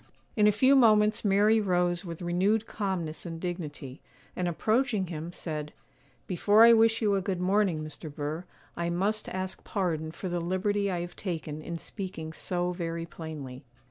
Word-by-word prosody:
In 210 -1 +5
a - - +6
few 260 +7 +4
moments 215 -4 +5
Mary 210 +2 +4
rose 175 -2 +1
with 170 -1 -7
renewed 195 +6 +1
calmness 185 -8 -3
and 165 -2 -6
dignity, 155 -7 -6 0.3
and 180 - -1
approaching 215 +4 +1
him, 165 -1 -6
said, 150 -4 -5 0.5
'Before 205 +4 +4
I 235 - +8
wish 225 0 +4
you 205 -2 +3
a 195 - +1
good 190 -1 -2
morning, 185 -3 +1
Mr. 155 0 -7
Burr, 150 +4 -4 0.3
I 170 0 -2
must 200 +5 -1
ask 185 0 -4
pardon 160 -6 -2
for 185 - -6
the 175 -1 -2
liberty 200 +3 0
I 175 -2 -1
have 175 0 -7
taken 160 -5 -4
in 170 +2 -5
speaking 165 -4 -6
so 180 +1 -1
very 165 -2 -4
plainly. 150 -6 -8
180 Hz, 170 wpm, -29 LUFS, 165-205 Hz, 0.5 s, I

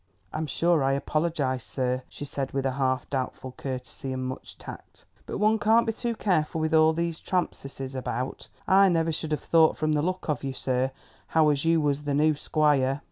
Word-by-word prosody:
"I'm 155 0 -2
sure 165 +2 +2
I 135 0 +2
apologise, 140 -2 -1
sir," 130 -1 -1
she 145 - -7
said 135 -1 -4
with 135 0 -1
a 135 - +2
half 130 -1 0
doubtful 130 -1 -3
courtesy 130 0 -6
and 130 0 -3
much 130 - -8
tact, - - -11 0.2
"but - - -4
one 215 +2 +3
can't 225 +3 +4
be 225 - 0
too 235 +1 -2
careful 165 -7 0
with 160 0 0
all 160 0 +6
these 170 0 -2
trampseses 135 -7 -3
about; 130 -2 -4 0.2
I 195 +1 +6
never 165 -2 +1
should 160 0 -3
have 150 - -2
thought 160 -1 +4
from 155 0 0
the 150 -1 +2
look 185 +3 -2
of 150 -4 -1
you, 135 -1 -3
sir, 130 0 0 0.4
how 160 -1 +4
as 145 +1 0
you 165 -1 +4
was 145 0 0
the 145 -1 0
new 155 +2 +4
squire." 145 -2 +1
150 Hz, 200 wpm, -27 LUFS, 135-165 Hz, 0.4 s, all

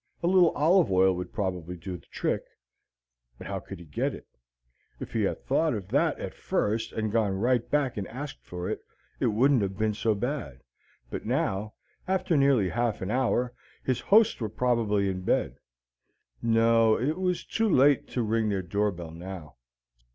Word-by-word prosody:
A - - +2
little 180 -2 +6
olive 165 - +4
oil 95 0 +4
would 90 0 -5
probably 90 -4 -3
do 90 +2 -6
the 90 - -13
trick, - - -1 1.0
but - - -10
how - - -3
could - - -9
he 85 - -12
get 75 - -2
it? - - -12 0.7
If - - -7
he 115 - +1
had 100 - -2
thought 150 0 +2
of 100 -3 -6
that 145 +6 +2
at - - -5
first 110 +2 -1
and 110 -1 -2
gone 110 -3 +1
right 120 +4 +1
back 140 -5 0
and 100 - -3
asked 135 +4 -7
for 90 0 -6
it, - - -2 0.4
it - - +2
wouldn't 125 +4 +3
have 95 -1 -2
been 110 0 +1
so 110 +1 0
bad; 120 - -4 0.5
but - - -5
now, 105 +3 -1 0.3
after 185 -3 +1
nearly 135 -9 +4
half 120 -2 -1
an 95 - -3
hour, 125 0 +1 0.3
his 130 -2 0
hosts 220 +2 +4
were 110 - -1
probably 110 -3 +1
in 95 -1 -2
bed. - - 0 0.8
No, 115 -1 +4
it 150 +8 -1
was 180 -2 -1
too 225 -1 0
late 140 -4 +4
to 125 - -2
ring 110 0 +1
their 95 -2 -1
door 100 +4 0
bell 85 -3 -8
now. 85 -2 -9
110 Hz, 180 wpm, -28 LUFS, 95-135 Hz, 1.0 s, little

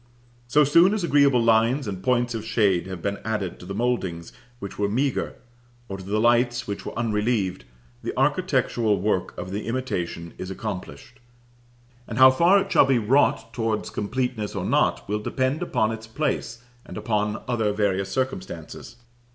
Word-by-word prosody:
So 150 +5 +4
soon 170 +8 +5
as 210 - -2
agreeable 140 -6 +4
lines 115 +4 +3
and 95 -2 -5
points 120 +2 +1
of 110 -2 -4
shade 105 -6 +1
have 95 -3 -7
been 100 0 -2
added 105 -4 -3
to 90 - -11
the 100 - -5
mouldings 100 -8 -2 0.2
which 100 -3 -8
were 100 -1 +1
meagre, 130 +5 -1 0.5
or 95 - -5
to - - -9
the 100 +3 -1
lights 120 +1 +2
which 100 -1 -5
were - - -6
unrelieved, 105 -4 -1 0.4
the - - -3
architectural 110 -4 +1
work 95 -1 -1
of 90 +1 -6
the 105 +3 -4
imitation 90 -9 -3
is 90 - -5
accomplished; 105 +5 -7 0.9
and 115 - -6
how 130 0 +9
far 170 +8 +5
it - - -4
shall - - +5
be 135 -2 +3
wrought 115 -1 +2
towards 115 -3 -2
completeness 120 -1 -3
or - - -2
not, - - +1
will 105 +1 -1
depend 130 +7 -1
upon 110 -10 0
its 110 0 -7
place, 120 -2 -3 0.2
and - - -9
upon 105 -1 -1
other 115 -4 0
various 100 -2 0
circumstances. 95 -10 -4
115 Hz, 170 wpm, -24 LUFS, 100-125 Hz, 0.9 s, how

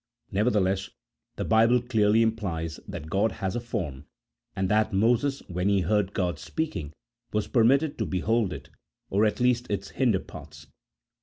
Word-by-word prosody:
Nevertheless, 100 -2 +1 0.5
the - - -3
Bible 115 +2 +4
clearly 110 -2 +3
implies 85 -8 -2
that 75 - -7
God 100 +1 +2
has 95 -1 -3
a - - 0
form, 75 - -5 0.5
and 95 - 0
that 110 +2 +2
Moses 120 +7 +2
when 90 +2 -1
he 100 -1 +3
heard 100 +2 0
God 90 -5 -1
speaking 80 - -4 0.4
was 105 -1 0
permitted 135 +5 +3
to 110 - -1
behold 100 +4 0
it, - - -8 0.4
or 100 +3 +3
at 105 - 0
least 125 0 +1
its 100 -1 -3
hinder 120 -8 +1
parts. - - -12
105 Hz, 155 wpm, -27 LUFS, 95-115 Hz, 0.5 s, Bible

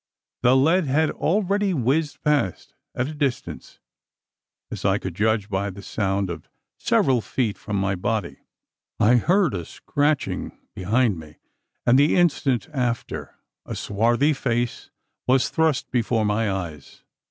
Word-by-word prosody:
The 125 +1 +5
lead 165 +6 +3
had 150 +4 +2
already 200 +1 0
whizzed 145 +4 0
past, 145 - 0 0.2
at 125 - -1
a 155 - -6
distance 145 -4 -3 0.9
as - - -6
I 95 0 +3
could 95 -3 -5
judge 105 +2 +1
by 100 -1 -1
the 100 +1 -10
sound 95 -2 -1
of 80 -2 -8 0.3
several 130 -3 +2
feet 110 -2 -1
from 105 - -5
my 95 0 +1
body. 100 -1 -2 0.6
I 120 +4 +5
heard 175 - +2
a 90 -3 -3
scratching 145 - -2 0.2
behind 105 0 +1
me; 80 -1 -12 0.5
and 125 +3 +5
the 145 +2 +4
instant 145 -8 +2
after, 120 -4 -3 0.3
a - - -6
swarthy 120 +8 +1
face 120 -3 -2 0.4
was 130 0 +3
thrust 160 -5 0
before 115 -3 +1
my 105 +1 +1
eyes. 85 -7 -6
120 Hz, 140 wpm, -23 LUFS, 100-145 Hz, 0.9 s, The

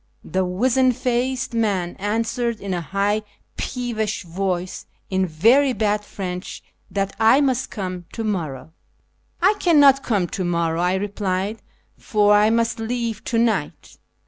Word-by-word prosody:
The 190 0 -1
wizen 255 +8 +2
faced 255 +1 -1
man 200 -6 0
answ^ered 230 +3 -1
in 195 -1 -4
a 175 - -2
high 200 +5 0 0.3
peevish 225 -5 -3
voice 180 +1 -3 0.2
in 190 0 +1
very 240 - +4
bad 210 -1 0
French 180 -2 -6 0.3
that 195 -1 -2
I 225 +5 +6
must 260 -3 +1
come 185 -4 -5
to 225 - -4
morrow. 160 -9 -3 0.3
" - - -43 0.3
I 390 +3 +6
cannot 285 -6 +5
come 205 -9 0
to 190 - -3
morrow/' 170 -1 0
I 180 +1 +2
replied, 200 +1 -2 0.2
" - - -41
for 210 -1 +3
I 210 +1 +5
must 230 0 +1
leave 230 -1 -3
to 235 - -1
ni"ht." 220 -9 -1
210 Hz, 145 wpm, -22 LUFS, 185-235 Hz, 0.3 s, I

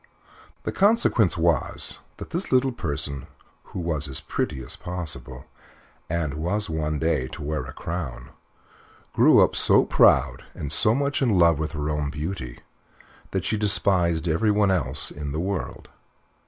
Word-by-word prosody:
The - - -2
consequence 195 - +3
was 85 0 0 0.2
that - - -9
this 175 +4 -3
little 130 +1 +3
person, 70 - -4 0.4
who - - -7
was 80 -4 -1
as 65 - -4
pretty 65 - -3
as 65 - -5
possible, 70 -8 -6 0.6
and 80 -3 -1
was 90 +6 -2
one 75 -1 -1
day 75 -4 0
to 70 - -8
wear 75 +1 -3
a - - -8
crown, 80 -6 -6 0.8
grew - - +6
up - - +1
so - - +5
proud - - +4
and 75 - -5
so 110 +2 +3
much 140 +1 -1
in 115 -8 +3
love 85 -3 +4
with 80 +1 -3
her 75 -1 -3
own 75 -1 -1
beauty 75 -4 -5 0.7
that 95 -1 -2
she 110 - 0
despised 90 -5 +2
everyone 105 +4 +2
else 70 -6 +1
in 75 -1 -6
the 75 - -2
world. 95 +2 -4
85 Hz, 155 wpm, -24 LUFS, 75-100 Hz, 0.8 s, grew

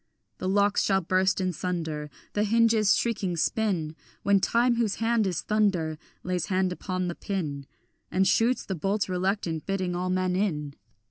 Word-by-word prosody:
The 185 - -2
locks 200 +1 +3
shall 195 -1 +2
burst 185 +3 +1
in 185 -1 0
sunder, 160 -4 -3 0.2
The 205 - +1
hinges 220 -1 +4
shrieking 200 -7 -1
spin, 170 -4 0 0.3
When 200 0 +4
time, 235 +4 +2
whose 225 -4 +1
hand 225 -2 +1
is 180 -4 -2
thunder, 185 -8 +1 0.2
Lays 180 -1 -1
hand 185 -2 +1
upon 185 0 -3
the 175 - -2
pin, 150 -9 -4 0.4
And 190 +1 +2
shoots 235 +6 +2
the 195 - -3
bolts 195 +4 -1
reluctant, 180 -3 -1
bidding 185 -2 -1
all 180 +1 -2
men 185 0 0
in. 150 -8 -1
190 Hz, 160 wpm, -27 LUFS, 180-205 Hz, 0.4 s, hinges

